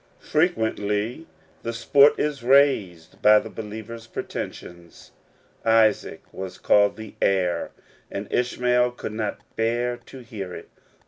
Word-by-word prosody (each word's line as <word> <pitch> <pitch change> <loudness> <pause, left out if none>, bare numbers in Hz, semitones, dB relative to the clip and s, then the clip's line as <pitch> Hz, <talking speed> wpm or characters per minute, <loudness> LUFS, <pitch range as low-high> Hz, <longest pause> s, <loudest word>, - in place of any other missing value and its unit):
Frequently 115 - 0 0.3
the 115 - -4
sport 140 +5 +5
is 150 -3 -1
raised 120 - +2
by 105 0 +7
the 110 +1 -3
believer's 110 +1 -8
pretensions. 85 -5 -8 0.5
Isaac 110 -2 +2
was 95 -1 -7
called 100 0 +3
"the 110 -1 -9
heir," 90 -3 +1 0.4
and 100 +1 -5
Ishmael 125 0 +1
could 110 - -6
not 105 -2 -3
bear 120 +2 0
to 130 - -11
hear 100 -6 -7
it. - - -10
110 Hz, 120 wpm, -24 LUFS, 100-125 Hz, 0.5 s, by